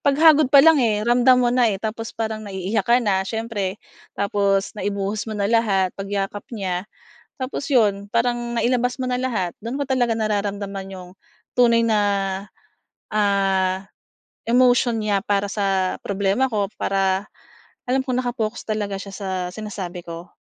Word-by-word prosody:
paghagod 300 Hz, 0 st, +5 dB
pa 275 Hz, +1 st, +7 dB
lang, 320 Hz, -4 st, +6 dB
eh, 215 Hz, -3 st, +1 dB
ramdam 250 Hz, +1 st, +5 dB
mo 240 Hz, -, +2 dB
na, 245 Hz, -2 st, +4 dB
eh, 200 Hz, -, -1 dB
tapos 220 Hz, +2 st, -5 dB
parang 220 Hz, -1 st, -2 dB
naiiyak 195 Hz, +1 st, -2 dB
ka 240 Hz, -, +6 dB
na 190 Hz, -2 st, +2 dB
siyempre, 210 Hz, -3 st, -3 dB, 0.4 s
tapos 200 Hz, -1 st, +1 dB
naibuhos 200 Hz, +2 st, -2 dB
mo 215 Hz, -, -4 dB
na 200 Hz, -, -1 dB
lahat 200 Hz, -4 st, +2 dB
pagyakap 200 Hz, 0 st, -3 dB
niya, 190 Hz, -2 st, -3 dB, 0.5 s
tapos 260 Hz, +2 st, -4 dB
'yon 205 Hz, -5 st, +2 dB
parang 240 Hz, 0 st, 0 dB
nailabas 250 Hz, +1 st, +1 dB
mo 255 Hz, -, -1 dB
na 250 Hz, -, 0 dB
lahat. 215 Hz, -9 st, -1 dB
Do'n 250 Hz, +5 st, -4 dB
ko -, -, +1 dB
talaga 250 Hz, -3 st, +1 dB
nararamdaman 200 Hz, -2 st, -2 dB
'yong 180 Hz, -1 st, -9 dB, 0.5 s
tunay 235 Hz, -2 st, +4 dB
na, 215 Hz, -2 st, +3 dB, 1.1 s
ah, 195 Hz, -2 st, +1 dB, 0.7 s
emotion 245 Hz, -1 st, +4 dB
niya 205 Hz, -2 st, 0 dB
para 205 Hz, -1 st, 0 dB
sa 195 Hz, -2 st, 0 dB
problema 200 Hz, +6 st, 0 dB
ko 205 Hz, -3 st, 0 dB
para 195 Hz, 0 st, 0 dB, 0.6 s
alam 265 Hz, +1 st, +2 dB
kong 255 Hz, 0 st, 0 dB
naka-focus 235 Hz, -2 st, -3 dB
talaga 205 Hz, -2 st, -2 dB
siya 200 Hz, -, -9 dB
sa 195 Hz, -1 st, -6 dB, 0.2 s
sinasabi 195 Hz, -4 st, -6 dB
ko. 170 Hz, +1 st, -8 dB
210 Hz, 150 wpm, -22 LUFS, 195-240 Hz, 1.1 s, pa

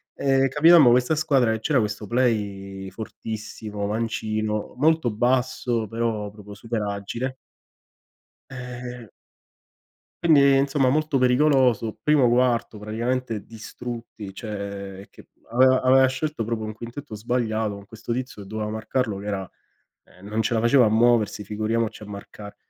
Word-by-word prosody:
ehm, 135 Hz, -1 st, +2 dB
capitammo 150 Hz, -1 st, +7 dB
questa 125 Hz, +6 st, +3 dB
squadra 135 Hz, -6 st, +2 dB
che 110 Hz, -, -3 dB
c'era 140 Hz, +2 st, +2 dB
questo 105 Hz, 0 st, -2 dB
play 100 Hz, -5 st, -1 dB
fortissimo, 105 Hz, 0 st, -6 dB
mancino, 110 Hz, -1 st, -2 dB
molto 155 Hz, -2 st, +3 dB
basso 120 Hz, 0 st, 0 dB
però 115 Hz, -2 st, -2 dB
proprio 105 Hz, -1 st, -12 dB
super 115 Hz, +1 st, -4 dB
agile 105 Hz, +6 st, -4 dB, 1.2 s
ehm 125 Hz, -1 st, -7 dB, 1.2 s
Quindi, 155 Hz, -4 st, +6 dB
ehm, 135 Hz, -, +4 dB
insomma, 135 Hz, -1 st, +2 dB
molto 150 Hz, 0 st, +1 dB
pericoloso, 125 Hz, -3 st, +3 dB
primo 145 Hz, -5 st, +4 dB
quarto 120 Hz, -2 st, +1 dB
praticamente 115 Hz, +1 st, -3 dB
distrutti, 115 Hz, -2 st, -8 dB
cioè 100 Hz, -2 st, -6 dB
è -, -, -14 dB
che -, -, -17 dB, 0.2 s
aveva 130 Hz, +2 st, +4 dB
aveva 130 Hz, +1 st, +5 dB
scelto 130 Hz, -1 st, -2 dB
proprio 115 Hz, 0 st, -3 dB
un 110 Hz, -, -5 dB
quintetto 120 Hz, +2 st, -8 dB
sbagliato 110 Hz, -1 st, -1 dB
con 100 Hz, 0 st, -11 dB
questo 110 Hz, +1 st, -5 dB
tizio 125 Hz, -4 st, -5 dB
che -, -, -13 dB
doveva 105 Hz, +1 st, -4 dB
marcarlo 110 Hz, 0 st, -2 dB
che 100 Hz, -, -8 dB
era 95 Hz, -3 st, -3 dB, 0.6 s
ehm, 90 Hz, +3 st, -17 dB
non 110 Hz, +2 st, -1 dB
ce 110 Hz, -, -1 dB
la 115 Hz, -, +2 dB
faceva 120 Hz, +2 st, +5 dB
a 105 Hz, -, +3 dB
muoversi, 115 Hz, -2 st, +3 dB
figuriamoci 110 Hz, +2 st, -2 dB
a 105 Hz, -, -8 dB
marcare. 105 Hz, 0 st, -10 dB
115 Hz, 145 wpm, -24 LUFS, 105-130 Hz, 1.2 s, capitammo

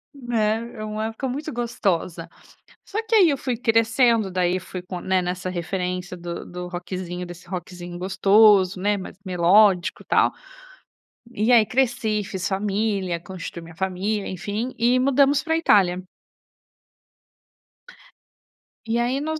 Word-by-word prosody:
Né. 235 Hz, -2 st, -1 dB
É 215 Hz, -, -6 dB
uma 215 Hz, 0 st, -3 dB
época 225 Hz, +4 st, -4 dB
muito 290 Hz, +5 st, -4 dB
gostosa. 185 Hz, -8 st, -2 dB, 0.6 s
Só, 410 Hz, -, -6 dB
que, 450 Hz, -, +2 dB
aí, 370 Hz, -6 st, +6 dB
eu 280 Hz, -, 0 dB
fui 255 Hz, -2 st, -2 dB
crescendo, 225 Hz, -2 st, +2 dB
daí, 180 Hz, 0 st, 0 dB
fui 185 Hz, 0 st, -7 dB
com 180 Hz, 0 st, -7 dB
né, 190 Hz, 0 st, +1 dB
nessa 180 Hz, +1 st, -3 dB
referência 180 Hz, 0 st, -3 dB
do 170 Hz, 0 st, -6 dB
do 180 Hz, 0 st, -7 dB
rockzinho 180 Hz, 0 st, -5 dB
desse 175 Hz, 0 st, -11 dB
rockzinho 175 Hz, -1 st, -7 dB
gostoso, 195 Hz, 0 st, +4 dB
né, 205 Hz, +2 st, +1 dB
mais 185 Hz, -1 st, -9 dB
melódico, 185 Hz, +1 st, +3 dB
tal. -, -, +3 dB, 1.0 s
E, 220 Hz, +2 st, +1 dB
aí 225 Hz, -2 st, +6 dB
cresci, 235 Hz, -4 st, 0 dB
fiz 190 Hz, -2 st, -4 dB
família, 195 Hz, -2 st, -1 dB
constitui 175 Hz, -1 st, -8 dB
minha 165 Hz, 0 st, -12 dB
família, 190 Hz, +3 st, -2 dB
enfim. 210 Hz, +7 st, -4 dB
E, 245 Hz, +2 st, +3 dB
mudamos 275 Hz, +2 st, +3 dB
para 320 Hz, -, -1 dB
a 325 Hz, -, +3 dB
Itália. 185 Hz, -, +3 dB, 2.8 s
E, 230 Hz, +1 st, 0 dB
aí 250 Hz, +3 st, 0 dB
nós 315 Hz, +1 st, -3 dB
200 Hz, 140 wpm, -23 LUFS, 180-230 Hz, 2.8 s, aí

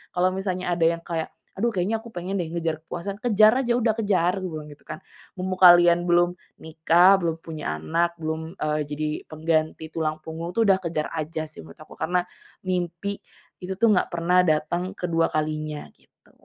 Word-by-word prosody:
kalau 180 Hz, +1 st, +3 dB
misalnya 185 Hz, -1 st, -3 dB
ada 165 Hz, -1 st, +1 dB
yang 170 Hz, 0 st, +1 dB
kayak, 165 Hz, -2 st, -4 dB, 0.2 s
"Aduh 230 Hz, +2 st, 0 dB
kayaknya 190 Hz, +4 st, 0 dB
aku 225 Hz, 0 st, -13 dB
pengen 185 Hz, +3 st, -3 dB
deh, 175 Hz, -, -1 dB
ngejar 165 Hz, -2 st, -1 dB
kepuasan," 195 Hz, +4 st, -5 dB
"kejar 215 Hz, -2 st, +5 dB
aja, 240 Hz, -, +2 dB
udah 230 Hz, -2 st, +1 dB
kejar!" 190 Hz, -4 st, +1 dB
Gue 185 Hz, -1 st, -4 dB
bilang 150 Hz, -1 st, -7 dB
itu 145 Hz, -, -15 dB
kan. 155 Hz, +1 st, -8 dB, 0.3 s
"Mumpung 185 Hz, 0 st, -3 dB
kalian 175 Hz, -1 st, +7 dB
belum 175 Hz, 0 st, +2 dB, 0.2 s
nikah, 170 Hz, +4 st, +4 dB
belum 165 Hz, -3 st, -2 dB
punya 150 Hz, -, -5 dB
anak, 170 Hz, -, 0 dB
belum, 160 Hz, +1 st, -4 dB
eee, 155 Hz, -4 st, -1 dB
jadi 150 Hz, +1 st, -3 dB, 0.2 s
pengganti 160 Hz, 0 st, -1 dB
tulang 155 Hz, -1 st, -3 dB
punggung, 165 Hz, +2 st, -6 dB
itu 230 Hz, -, +1 dB
udah 195 Hz, -, +5 dB
kejar 160 Hz, -3 st, -2 dB
aja 155 Hz, 0 st, -4 dB
sih -, -, -11 dB
menurut 80 Hz, -, -15 dB
aku, -, -, -14 dB
karena 180 Hz, +1 st, +1 dB, 0.4 s
mimpi 180 Hz, +2 st, -3 dB, 0.4 s
itu 190 Hz, +1 st, -5 dB
tuh 225 Hz, +3 st, +3 dB
nggak 190 Hz, -, +2 dB
pernah 175 Hz, +2 st, +2 dB
dateng 170 Hz, +5 st, 0 dB
kedua 165 Hz, -2 st, +1 dB
kalinya," 155 Hz, -1 st, -3 dB
gitu. -, -, -30 dB
170 Hz, 180 wpm, -24 LUFS, 160-185 Hz, 0.4 s, kalian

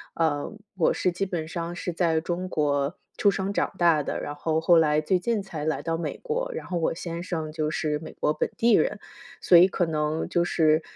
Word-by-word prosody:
呃， 150 Hz, -3 st, 0 dB, 0.2 s
我 175 Hz, -4 st, +3 dB
是 180 Hz, -, 0 dB
基 175 Hz, +3 st, -3 dB
本 170 Hz, -4 st, -3 dB
上 170 Hz, +1 st, -4 dB
是 175 Hz, 0 st, -4 dB
在 165 Hz, -2 st, +1 dB
中 175 Hz, +3 st, -3 dB
国 145 Hz, 0 st, 0 dB, 0.2 s
出 205 Hz, -, +3 dB
生 195 Hz, +1 st, -1 dB
长 -, -, 0 dB
大 170 Hz, -3 st, +4 dB
的， -, -, -3 dB
然 145 Hz, -, -5 dB
后 155 Hz, +2 st, -1 dB
后 170 Hz, +2 st, +4 dB
来 155 Hz, -2 st, +4 dB
最 180 Hz, +4 st, +1 dB
近 220 Hz, +3 st, -1 dB
才 165 Hz, -6 st, -6 dB
来 155 Hz, -3 st, -1 dB
到 165 Hz, 0 st, -1 dB
美 165 Hz, -2 st, -4 dB
国， -, -, -2 dB
然 -, -, -5 dB
后 175 Hz, -, -2 dB
我 165 Hz, -, 0 dB
先 170 Hz, 0 st, -5 dB
生 160 Hz, -4 st, -4 dB
就 155 Hz, -1 st, -2 dB
是 150 Hz, -1 st, -1 dB
美 160 Hz, -, -9 dB
国 150 Hz, -, 0 dB
本 -, -, -1 dB
地 235 Hz, +1 st, +4 dB
人。 -, -, +2 dB, 0.4 s
所 180 Hz, -, +4 dB
以 175 Hz, +2 st, +9 dB
可 185 Hz, -1 st, 0 dB
能 155 Hz, 0 st, -1 dB
就 175 Hz, -, +2 dB
是， 160 Hz, -2 st, +3 dB
165 Hz, 240 characters per minute, -26 LUFS, 155-180 Hz, 0.4 s, 以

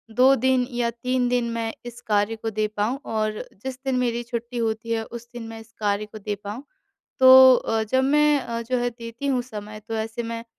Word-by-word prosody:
2 260 Hz, +2 st, +6 dB
दिन 260 Hz, 0 st, +2 dB
या 240 Hz, -1 st, 0 dB
3 250 Hz, +2 st, -1 dB
दिन 245 Hz, -1 st, +1 dB
मैं 230 Hz, -1 st, -3 dB
इस 240 Hz, 0 st, -8 dB
कार्य 210 Hz, +1 st, +1 dB
को 225 Hz, 0 st, -4 dB
दे 215 Hz, 0 st, -1 dB
पाऊँ 230 Hz, +7 st, 0 dB
और 215 Hz, -1 st, -1 dB, 0.2 s
जिस 260 Hz, -1 st, -5 dB
दिन 265 Hz, -1 st, 0 dB
मेरी 240 Hz, -1 st, -1 dB
छुट्टी 240 Hz, 0 st, -5 dB
होती 225 Hz, 0 st, -2 dB
है 225 Hz, -1 st, 0 dB
उस 235 Hz, 0 st, -9 dB
दिन 240 Hz, -1 st, -7 dB
मैं 225 Hz, 0 st, -8 dB
इस 225 Hz, 0 st, -15 dB
कार्य 205 Hz, 0 st, 0 dB
को 215 Hz, +1 st, -11 dB
दे 210 Hz, 0 st, -4 dB
पाऊँ। 210 Hz, +6 st, -6 dB, 0.6 s
तो 260 Hz, 0 st, +9 dB
अ, 225 Hz, -2 st, 0 dB
जब 260 Hz, +5 st, +1 dB
मैं 280 Hz, -5 st, +2 dB
जो 255 Hz, +2 st, -1 dB
है 245 Hz, 0 st, 0 dB
देती 230 Hz, +2 st, -7 dB
हूँ 255 Hz, -3 st, +1 dB
समय 215 Hz, -3 st, -8 dB
तो 225 Hz, -, -3 dB
ऐसे 220 Hz, +2 st, -3 dB
मैं 230 Hz, 0 st, -5 dB
235 Hz, 215 wpm, -24 LUFS, 220-250 Hz, 0.6 s, तो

